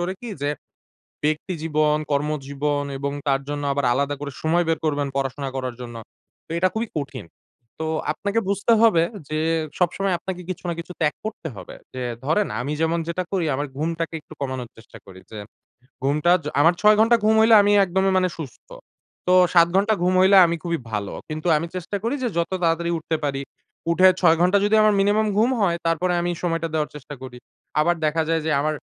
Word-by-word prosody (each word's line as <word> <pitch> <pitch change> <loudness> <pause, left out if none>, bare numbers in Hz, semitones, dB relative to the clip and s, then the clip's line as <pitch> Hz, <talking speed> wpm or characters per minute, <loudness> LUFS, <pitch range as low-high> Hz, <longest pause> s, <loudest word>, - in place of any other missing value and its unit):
করে 175 +2 -1
কি 240 - -7
যে, 145 - +1 0.7
ব্যক্তিজীবন, 155 -1 0
কর্মজীবন 145 0 -1
এবং 140 0 -3 0.2
তার 135 0 +2
জন্য 145 0 -3
আবার 140 -1 -1
আলাদা 140 +3 0
করে 145 -1 -5
সময় 170 +2 +2
বের 165 - +1
করবেন 145 -2 0
পড়াশোনা 135 0 -2
করার 130 -2 -3
জন্য। 120 -1 -8 0.5
তো - - -32
এটা 185 +2 +3
খুবই 225 +1 -2
কঠিন। 140 - -6 0.5
তো 160 - -3 0.3
আপনাকে 205 +6 -1
বুঝতে 200 +3 +2
হবে 215 -8 +5 0.3
যে, 155 - -2 0.4
সবসময় 185 +2 +1
আপনাকে 185 +1 -6
কিছু 185 - -5
না 170 - -1
কিছু 170 - -9
ত্যাগ 150 -2 +2
করতে 215 -7 -5
হবে। - - -9 0.2
যে 130 - -4 0.2
ধরেন 195 +8 +1
আমি 140 +4 -3
যেমন 165 +1 +1
যেটা 175 +2 -1
করি, 185 -3 0
আমার 145 +2 -2
ঘুমটাকে 165 +1 -2
একটু 155 - -17
কমানোর 130 -3 -4
চেষ্টা 115 0 -14
করি। 95 -1 -13
যে 110 - -8 0.7
ঘুমটা 150 +5 +2
য - - -10
আমার 165 +3 +5
৬ 210 0 +6
ঘন্টা 230 +2 +5
ঘুম 220 +1 +4
হইলে 225 +1 +6
আমি 205 0 +3
একদমই 190 +1 +1
মানে 185 0 +2
সুস্থ। 145 -7 -9 0.6
তো 180 - +5 0.2
৭ 170 -1 +6
ঘন্টা 205 +3 +3
ঘুম 180 +1 +2
হইলে 190 +1 +6
আমি 170 - -1
খুবই 170 -1 -2
ভালো। 105 -2 -3 0.2
কিন্তু 155 +2 -5
আমি 160 +3 -2
চেষ্টা 185 +3 -4
করি 235 +4 0
যে 245 - +1
যত 170 - 0
তাড়াতাড়ি 170 +1 +1
উঠতে 160 0 -2
পারি। 140 -1 -2 0.5
উঠে 185 +3 +6
৬ 165 -2 +5
ঘন্টা 180 +3 +4
যদি 210 +1 +2
আমার 215 -1 +4
মিনিমাম 205 +2 +2
ঘুম 230 +4 +4
হয় 175 -4 +2
তারপরে 175 +2 +1
আমি 175 0 -1
সময়টা 165 -1 -1
দেওয়ার 155 -1 0
চেষ্টা 145 0 -9
করি। 125 -1 -9 0.4
আবার 175 +3 +3
দেখা 160 +1 +1
যায় 165 0 +1
যে - - +1
আমার, 155 +1 0
165 Hz, 195 wpm, -23 LUFS, 145-185 Hz, 0.7 s, ৬